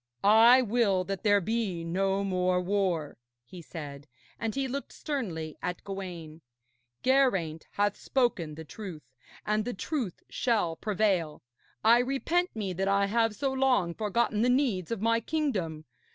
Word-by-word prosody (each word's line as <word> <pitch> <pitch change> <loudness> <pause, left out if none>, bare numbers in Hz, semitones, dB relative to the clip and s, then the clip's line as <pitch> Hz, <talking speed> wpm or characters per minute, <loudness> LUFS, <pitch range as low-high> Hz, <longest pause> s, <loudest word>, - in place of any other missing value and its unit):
'I 230 +5 +7
will 205 -5 +2
that 195 0 -4
there 205 -2 +4
be 200 -3 -2
no 195 +3 0
more 185 -1 +1
war,' 180 -5 -1 0.3
he 175 +8 -11
said, 145 -3 -8 0.3
and 225 -1 -2
he 270 -1 0
looked 275 +2 -5
sternly 175 - -4
at 180 -1 -4
Gawaine. 175 -5 -7 0.6
'Geraint 195 - +2
hath 205 0 +1
spoken 195 - 0
the 160 +1 -9
truth, 180 -3 -8 0.4
and 215 0 +1
the 245 0 -4
truth 240 - -3
shall 210 -9 0
prevail. 190 -6 0 0.4
I 230 +2 +6
repent 275 +7 0
me 200 -4 -3
that 190 +2 -1
I 200 0 +3
have 225 +1 +1
so 270 +1 -1
long 255 -10 +2
forgotten 215 +2 0
the 245 - +3
needs 245 - +1
of 230 -4 -3
my 230 0 +3
kingdom. 210 - -2
200 Hz, 150 wpm, -29 LUFS, 175-235 Hz, 0.6 s, I